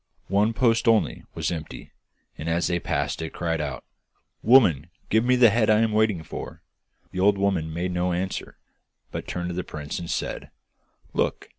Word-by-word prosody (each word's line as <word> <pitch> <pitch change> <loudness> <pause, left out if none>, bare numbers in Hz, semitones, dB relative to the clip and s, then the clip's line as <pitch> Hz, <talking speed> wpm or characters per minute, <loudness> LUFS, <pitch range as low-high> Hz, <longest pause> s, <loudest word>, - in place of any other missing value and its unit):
One 105 +4 +2
post 115 -1 +2
only 115 -1 +2
was - - -1
empty, 80 -3 -7 0.4
and 80 - -5
as 85 +1 +1
they 85 -1 0
passed - - -2
it 80 - -5
cried 80 -2 -1
out: 70 -4 -4 0.6
'Woman, 95 - +5 0.2
give 110 +1 +4
me 125 +1 +3
the 120 -3 +6
head 110 0 +2
I 110 0 +5
am 115 -1 +2
waiting 105 -6 +2
for!' - - -8 0.5
The 90 - -5
old 100 +1 +4
woman 95 -5 0
made 90 +3 -2
no 90 0 0
answer, 90 +2 -3 0.5
but - - -5
turned 90 0 -3
to - - -3
the 90 +1 -3
prince 75 -1 -6
and 85 -1 -7
said: - - -3 0.6
'Look! - - -1
90 Hz, 180 wpm, -25 LUFS, 85-110 Hz, 0.6 s, the